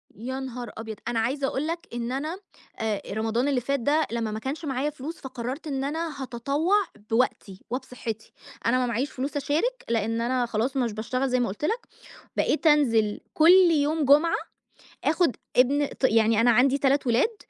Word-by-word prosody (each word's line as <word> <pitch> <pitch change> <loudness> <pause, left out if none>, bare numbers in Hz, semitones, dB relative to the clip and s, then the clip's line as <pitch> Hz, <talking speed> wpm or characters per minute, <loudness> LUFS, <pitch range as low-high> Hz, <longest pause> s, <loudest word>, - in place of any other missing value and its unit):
يا 260 +5 -5
نهار 250 -3 -6
أبيض، 220 -1 -6
أنا 235 -1 0
عايزة 270 +5 0
اقول 275 +4 -2
لك 335 +1 -4
إن 240 0 -3
أنا 305 +7 -3 0.4
أ 215 -3 -2
رمضان 225 +4 0
اللي 270 -3 +1
فات 275 +3 -1
ده 295 +6 +2
لما 225 -2 -2
ما 215 - -4
كانش 285 +7 -4
معايا 270 +1 -1
فلوس، 300 +3 -7
فقررت 260 +3 -5
إن 270 -2 -2
أنا 305 0 -3
هاتطوّع 280 - 0 0.3
بوقتي 225 -4 0
وبصحِّتي، 250 -4 -5 0.3
أنا 240 +2 +3
ما 250 - +1
معييش 245 +5 -1
فلوس 275 +3 -3
أشارك، 320 - -1
لإن 225 0 0
أنا 245 +1 +1
خلاص 235 +4 -1
مش 240 -4 0
باشتغل 255 +5 -2
زي 255 0 +2
ما 245 - +1
قلت 210 +10 -4
لك، 460 +9 -2 0.5
بقيت 320 - +1
أنزل 230 -9 +3
كل 350 +2 +7
يوم 300 0 +2
جمعة، 295 +5 +5 0.7
آخد 320 - +2 0.2
ابن 280 +4 +4
ط 270 - -8
يعني 225 -2 +4
أنا 240 +1 +5
عندي 260 +4 +4
3 275 0 +2
ولاد 265 - +2
260 Hz, 180 wpm, -26 LUFS, 235-290 Hz, 0.7 s, كل